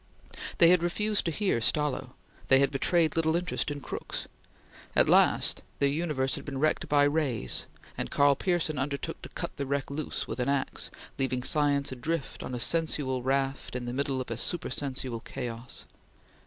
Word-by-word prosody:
They 170 - +8
had 180 -2 +5
refused 210 +5 0
to 165 - +1
hear 185 - 0
Stallo. 150 +3 0 0.3
They 135 - +7
had 140 0 +3
betrayed 160 +3 +2
little 160 0 +2
interest 180 -2 -1
in 145 -1 -4
Crookes. - - -5 0.7
At - - +6
last - - +4 0.2
their 140 - +3
universe 145 -3 0
had - - -4
been 140 -2 -5
wrecked 155 +3 +1
by 145 -1 +5
rays, 145 - 0 0.3
and - - -2
Karl 140 0 +5
Pearson 165 -5 0
undertook 140 0 -3
to - - -9
cut - - -5
the 140 - -3
wreck 140 0 -1
loose 150 +1 -3
with 115 - -5
an 125 +2 +1
axe, 140 -1 -1 0.3
leaving 130 -2 0
science 145 -1 +2
adrift 140 +4 -3
on 125 - -4
a - - -3
sensual 145 -3 +1
raft 135 0 -1
in 125 -1 -3
the 120 - -4
midst 140 +2 -1
of 130 -3 -2
a 115 - -2
supersensual 130 -5 -1
chaos. 120 -1 -6
140 Hz, 175 wpm, -29 LUFS, 130-155 Hz, 0.7 s, They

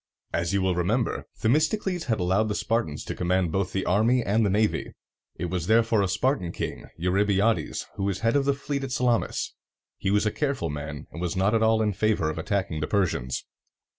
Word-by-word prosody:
As 85 +1 0
you 100 -1 +1
will 95 -1 +2
remember, 100 +7 0
Themistocles 160 - +1
had 115 -5 0
allowed 95 +5 +2
the 105 - -2
Spartans 110 -12 -1
to - - -3
command 90 -1 0
both 95 +1 -1
the 95 - -2
army 115 +6 +3
and 110 +2 +2
the 105 - +2
navy. 105 +2 0 0.4
It 85 - -4
was 90 -3 -2
therefore 115 -1 +4
a 100 - +1
Spartan 100 -1 0
king, - - -5
Eu 90 +2 0
ry 100 +3 +3
bi´a 105 +2 +3
des, - - -5
who 95 - -1
was 100 -2 -1
head 115 +2 +2
of 140 -1 +3
the 140 0 +2
fleet 140 0 -3
at 135 - -4
Salamis. 125 -2 0 0.5
He - - -1
was 105 +2 +2
a 105 - +2
careful 135 - -1
man, 75 0 -6
and 85 - -7
was 90 -2 -2
not 95 +3 +2
at 115 - +3
all 110 0 +3
in 105 -1 +1
favor 105 -6 +1
of - - -6
attacking 95 -7 -1
the 75 - -2
Persians. 90 - 0
100 Hz, 220 wpm, -26 LUFS, 90-115 Hz, 0.5 s, therefore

